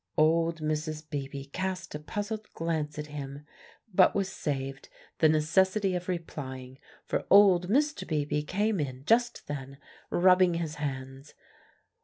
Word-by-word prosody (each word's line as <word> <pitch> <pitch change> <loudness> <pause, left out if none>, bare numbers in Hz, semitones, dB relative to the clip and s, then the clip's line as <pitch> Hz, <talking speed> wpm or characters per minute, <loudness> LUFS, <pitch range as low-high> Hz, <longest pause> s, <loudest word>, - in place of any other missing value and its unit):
Old 165 +1 +3
Mrs. 155 0 -2
Beebe 140 -2 -5
cast 190 +1 -3
a 150 - -4
puzzled 210 +7 -5
glance 155 -3 -2
at 150 - -4
him, 145 -1 -7 0.5
but 185 0 +5
was 195 -1 0
saved 135 -5 -4 0.3
the 155 - +6
necessity 190 +6 +2
of 180 0 -3
replying; 130 -7 -5 0.3
for - - -2
old 190 -3 +6
Mr. 295 +6 +1
Beebe 150 -1 0
came 200 +6 0
in 135 -2 -4
just 240 +3 +2
then, 140 -1 -6 0.3
rubbing 180 -1 +5
his 160 -2 -3
hands. 135 0 -5
155 Hz, 135 wpm, -29 LUFS, 145-185 Hz, 0.5 s, the